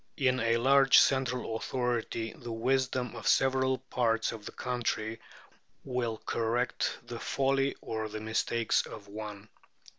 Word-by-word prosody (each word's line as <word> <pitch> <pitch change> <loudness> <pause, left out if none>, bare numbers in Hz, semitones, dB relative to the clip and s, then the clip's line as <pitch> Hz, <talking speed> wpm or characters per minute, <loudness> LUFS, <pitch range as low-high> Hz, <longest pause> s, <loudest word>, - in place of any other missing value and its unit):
In 130 -2 +2
a 115 0 +2
large 135 +3 +6
central 125 -4 +2
authority 120 -1 -2
the 120 -7 -8
wisdom 130 +1 0
of - - -5
several 130 0 +3
parts 120 -3 0
of 110 -2 -8
the - - -6
country 115 -2 -2 0.6
will 125 -4 -2
correct 120 +2 0
the 120 -1 -6
folly 135 0 +1
or 110 -1 -3
the 110 +1 -5
mistakes 110 +1 +1
of 100 -1 -10
one. 105 0 -7
120 Hz, 130 wpm, -30 LUFS, 110-130 Hz, 0.6 s, large